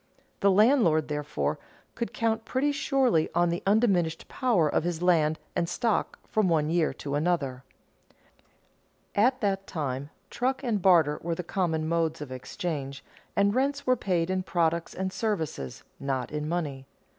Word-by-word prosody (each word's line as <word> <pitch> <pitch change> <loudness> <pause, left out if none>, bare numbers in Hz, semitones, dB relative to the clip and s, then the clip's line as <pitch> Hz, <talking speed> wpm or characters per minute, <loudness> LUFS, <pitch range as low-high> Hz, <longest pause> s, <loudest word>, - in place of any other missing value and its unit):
The 200 - +4
landlord, 195 - +4
therefore, 150 0 -2 0.3
could 235 - -3
count 225 -1 0
pretty 265 +5 0
surely 270 - +2
on 175 0 +3
the 170 +1 -2
undiminished 195 -6 +2
power 230 - +2
of 150 - +1
his 175 0 -2
land 160 -3 +3 0.2
and 170 - 0
stock 225 +4 0
from 215 -4 +1
one 155 -2 +2
year 170 -2 +2
to 140 - -2
another. 145 -5 0 1.5
At 255 +5 +3
that 195 -2 0
time, 140 -4 -3 0.2
truck 260 +3 -1
and 225 -6 0
barter 165 -5 +4
were 170 0 -2
the 180 - -4
common 160 -3 -1
modes 165 -1 0
of 150 -3 -7
exchange, 140 +1 -5 0.3
and 200 0 +3
rents 280 +3 0
were 255 - +4
paid 180 -6 0
in 185 0 0
products 170 -2 0
and 190 0 -3
services, 160 - -3 0.2
not 135 -2 -2
in 150 0 -3
money. 145 -6 -3
175 Hz, 155 wpm, -28 LUFS, 155-210 Hz, 1.5 s, The